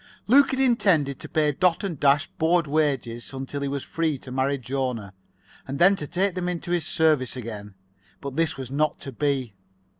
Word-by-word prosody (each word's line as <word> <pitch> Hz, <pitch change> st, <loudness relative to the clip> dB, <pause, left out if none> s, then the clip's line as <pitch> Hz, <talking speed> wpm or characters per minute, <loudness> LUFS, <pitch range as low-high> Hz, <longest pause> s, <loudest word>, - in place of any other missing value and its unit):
Luke 275 Hz, +5 st, +6 dB
had 265 Hz, -, -1 dB
intended 185 Hz, -, +2 dB
to -, -, -9 dB
pay 155 Hz, -2 st, +2 dB
Dot 180 Hz, +4 st, +1 dB
and 175 Hz, -8 st, -4 dB
Dash 145 Hz, +1 st, +4 dB
board 165 Hz, +1 st, +1 dB
wages 140 Hz, -6 st, -1 dB
until 135 Hz, +1 st, -5 dB
he 140 Hz, -, -1 dB
was 140 Hz, 0 st, -3 dB
free 160 Hz, -3 st, -1 dB
to 130 Hz, -, -11 dB
marry 135 Hz, +2 st, 0 dB
Jona, 125 Hz, -6 st, -3 dB, 0.5 s
and 135 Hz, +1 st, -4 dB
then 190 Hz, +5 st, +6 dB
to 150 Hz, -, -6 dB
take 185 Hz, +4 st, 0 dB
them 180 Hz, 0 st, -2 dB
into 175 Hz, 0 st, -4 dB
his 175 Hz, -3 st, +1 dB
service 155 Hz, -6 st, +2 dB
again. 105 Hz, -5 st, -7 dB, 0.4 s
But 140 Hz, -1 st, -6 dB
this 165 Hz, -2 st, 0 dB
was 130 Hz, -1 st, -7 dB
not 155 Hz, +2 st, 0 dB
to 135 Hz, -, -6 dB
be. 135 Hz, -4 st, -1 dB
145 Hz, 190 wpm, -25 LUFS, 130-170 Hz, 0.5 s, Luke